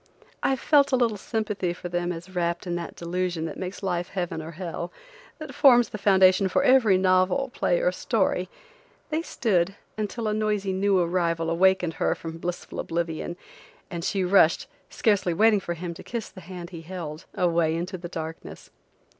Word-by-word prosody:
I 270 - +2
felt 280 +2 +3
a - - +4
little 235 -4 +2
sympathy 205 -4 -2
for 175 - -7
them 175 0 -1
as 175 +2 -7
wrapped 170 0 -1
in 175 - -3
that 175 -1 -4
delusion 175 -1 -2
that 165 - -5
makes 185 +2 -6
life 175 -2 -1
heaven 175 -4 -3
or 160 +2 -8
hell, 175 0 -5 0.5
that - - -8
forms 245 -5 +6
the 215 - -6
foundation 190 -1 +5
for 275 +9 +1
every 250 -8 +5
novel, 185 +7 +2
play - - +1
or - - +2
story, - - 0 0.6
they 310 +1 +1
stood, 195 - 0 0.2
until 215 +2 -2
a 210 - +1
noisy 210 -2 0
new 195 +1 +2
arrival 170 -2 0
wakened 185 -1 +3
her - - +2
from 165 0 -7
blissful 175 +1 -5
oblivion, 170 0 -3 0.5
and 170 -1 -4
she 195 +1 0
rushed, 180 -3 +4 0.2
scarcely 200 -6 +1
waiting 215 +2 +5
for 175 -2 -4
him 170 +1 -5
to - - -11
kiss 235 -3 -5
the 185 - -12
hand 175 0 -9
he 170 -2 -8
held, 165 -2 -7
away 170 -2 +2
into 175 +3 -3
the 175 -1 -7
darkness. 160 -1 -7
185 Hz, 180 wpm, -26 LUFS, 170-205 Hz, 0.6 s, forms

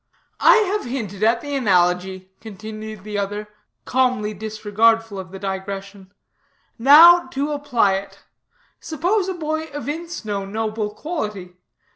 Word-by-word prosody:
"I - - +7
have 420 -4 +1
hinted 220 -6 -5
at 230 +2 +3
the 290 -1 -6
analogy," 185 -4 +1
continued 215 -1 -9
the 210 -1 -4
other, 205 +1 -4 0.4
calmly 250 -5 0
disregardful 215 +1 0
of 185 -3 -8
the 195 - -9
digression; 195 0 -6 0.7
"now 330 +7 +8
to 285 +2 -3
apply 250 -9 +1
it. 195 +1 -10 0.6
Suppose 360 +5 -1
a 375 - -3
boy 315 -1 -3
evince 305 +1 -6
no 200 -2 -3
noble 215 +1 -3
quality. 210 - -5
215 Hz, 125 wpm, -21 LUFS, 200-290 Hz, 0.7 s, now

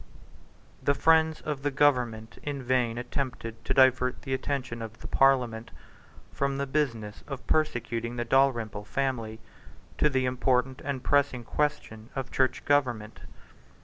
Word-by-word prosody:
The 140 - +2
friends 160 +1 +3
of 150 -3 -4
the 145 - 0
government 125 -6 +1
in 140 -2 -4
vain 125 -2 +1
attempted 120 -2 -4
to - - 0
divert 130 -1 +4
the 135 - -3
attention 130 -3 -3
of 115 0 -8
the - - -7
Parliament 125 -4 +2 0.6
from 140 0 -1
the 140 - -1
business 120 -8 -2
of 140 -2 -7
persecuting 120 -6 0
the 120 0 -2
Dalrymple 115 -5 +1
family 115 -4 -2 0.6
to 150 - +4
the 130 -2 +1
important 125 0 +1
and 135 -3 -3
pressing 140 -4 +2
question 115 -5 -2
of 135 -1 -4
Church 130 -1 0
Government. 125 -7 +1
130 Hz, 140 wpm, -28 LUFS, 115-140 Hz, 0.6 s, divert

